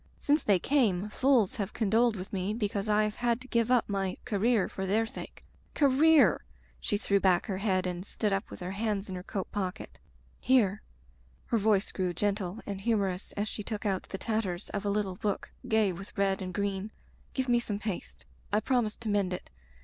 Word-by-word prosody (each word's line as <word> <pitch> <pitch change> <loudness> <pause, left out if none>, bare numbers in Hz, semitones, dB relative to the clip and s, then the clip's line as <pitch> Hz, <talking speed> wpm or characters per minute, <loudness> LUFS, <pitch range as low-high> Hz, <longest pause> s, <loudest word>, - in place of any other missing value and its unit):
Since 295 +2 +2
they 200 -3 +4
came 210 -4 +1
fools 255 -1 +2
have 205 -1 -3
condoled 225 +2 +2
with 190 +1 -7
me 195 +2 -1
because 205 -2 -2
I 210 0 +4
have 215 0 -2
had 240 -1 +1
to 260 - -10
give 235 -2 +1
up 250 -2 +3
my 195 -2 -1
'career' 220 -1 +2
for 190 0 -4
their 220 +4 +2
sake. - - -8 0.3
Career!" 295 +2 +5 0.4
She 205 - 0
threw 200 -1 +2
back 185 -2 +3
her 190 -3 -3
head 190 -3 +1
and 180 0 -3
stood 205 +1 -1
up 195 +2 -1
with - - -10
her 180 +1 -4
hands 205 0 -2
in - - -4
her 180 - -5
coat 190 +1 -5
pocket. 190 -3 -4 0.4
"Here," 215 -6 +3 0.6
her 230 - +1
voice 205 -1 +2
grew 180 -2 -2
gentle 200 +1 -1
and 200 -1 -5
humorous 200 -4 0
as 205 +1 -2
she 215 - -5
took 215 +1 -5
out 195 -2 -1
the 195 - -4
tatters 210 -4 -2
of 200 0 -3
a - - +1
little 200 -2 -1
book 205 -1 -2 0.2
gay 220 -5 +3
with 195 +4 -10
red 195 -1 +1
and 185 -1 -4
green, 200 +1 -2 0.5
"give 260 -1 0
me 240 -1 +4
some 210 -4 -3
paste. 205 -3 -5 0.3
I 210 - +3
promised 235 -3 0
to 225 - -3
mend 200 -3 +1
it. 180 - -6
205 Hz, 205 wpm, -30 LUFS, 195-225 Hz, 0.6 s, Career